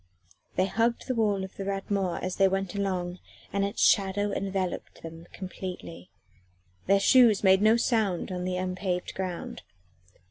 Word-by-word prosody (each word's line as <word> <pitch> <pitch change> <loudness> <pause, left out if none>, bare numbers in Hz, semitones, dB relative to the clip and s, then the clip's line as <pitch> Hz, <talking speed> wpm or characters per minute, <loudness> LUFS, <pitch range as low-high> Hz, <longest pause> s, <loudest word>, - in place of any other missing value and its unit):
They 185 - +2
hugged 230 +4 0
the 255 - 0
wall 210 -4 +1
of 190 - -9
the 195 - -4
Rat 195 0 -4
Mort 195 -3 -1
as 185 0 -3
they 195 - +5
went 195 -1 -2
along 185 -3 -2 0.3
and 200 0 +1
its 200 0 -1
shadow 205 0 +3
enveloped 195 -2 -3
them 165 +1 -9
completely: 180 - -8 0.8
their 195 +1 +5
shoes 230 -1 +5
made 190 0 +5
no 220 +2 +5
sound 215 -7 0
on 180 -1 -3
the 180 0 -2
unpaved 185 0 -3
ground. 185 -2 -5
190 Hz, 155 wpm, -27 LUFS, 180-200 Hz, 0.8 s, they